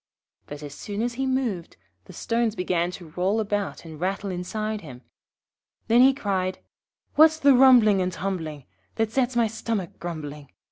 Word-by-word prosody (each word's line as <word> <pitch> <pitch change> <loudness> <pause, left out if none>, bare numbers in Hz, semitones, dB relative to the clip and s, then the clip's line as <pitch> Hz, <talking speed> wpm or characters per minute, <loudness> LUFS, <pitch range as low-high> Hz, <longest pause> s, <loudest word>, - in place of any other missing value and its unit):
But 145 +1 -8
as 145 -1 -7
soon 205 +7 -4
as 240 0 -1
he 265 +2 -2
moved 240 -10 -2 0.3
the - - -12
stones 230 -1 -1
began 175 -2 0
to 180 -2 -9
roll 185 +7 0
about 205 -4 -2
and 160 -2 -10
rattle 195 +2 -2
inside 215 +4 -3
him. 130 -5 -11 0.9
Then 235 +2 +6
he 265 +1 +7
cried 190 -8 -2 0.6
'What's 315 +1 +6
the 280 -3 +5
rumbling 245 -6 +6
and 180 0 -1
tumbling 160 -5 -4 0.3
That 225 -1 0
sets 255 0 0
my 235 -1 +3
stomach 220 -4 -4
grumbling? 150 -4 -7
200 Hz, 160 wpm, -25 LUFS, 175-235 Hz, 0.9 s, he